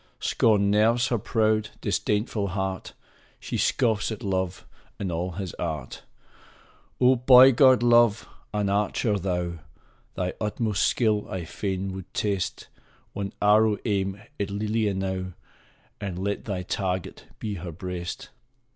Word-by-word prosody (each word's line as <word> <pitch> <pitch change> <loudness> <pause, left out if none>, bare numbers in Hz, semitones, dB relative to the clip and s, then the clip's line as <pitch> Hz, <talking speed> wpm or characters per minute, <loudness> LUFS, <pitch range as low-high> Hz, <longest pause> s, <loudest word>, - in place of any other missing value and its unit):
Scorn 100 -3 +2
nerves 115 +4 +3
her 120 - 0
proud, 110 0 +1
disdainful 105 -1 -1
heart! 95 -1 -3 0.5
She - - -5
scoffs 115 -4 +1
at 110 +2 -6
Love 95 -2 -2 0.3
and 95 -3 -3
all 90 +2 -3
his 95 -1 -5
art! 75 -6 -4 1.0
Oh, 130 +1 +5
boy 125 +1 +8
god, 130 -1 +5
Love! 120 -2 +4 0.2
An 105 -1 -1
archer 105 +1 0
thou! 90 -2 -2 0.6
Thy 90 0 -2
utmost 105 -2 0
skill 105 0 +1
I 90 -3 -4
fain 95 +2 -3
would 95 -1 -9
test; 100 -3 -2 0.5
One 100 -1 -4
arrow 105 0 +4
aim 100 -2 -1 0.2
at 100 -1 -1
Lelia 105 0 -1
now, 95 -1 -3 0.7
And 95 -3 -4
let 100 +2 -3
thy 95 -3 -3
target 95 -1 -3
be 105 -2 -4
her 85 -1 -6
breast 90 0 -6
100 Hz, 130 wpm, -26 LUFS, 95-110 Hz, 1.0 s, boy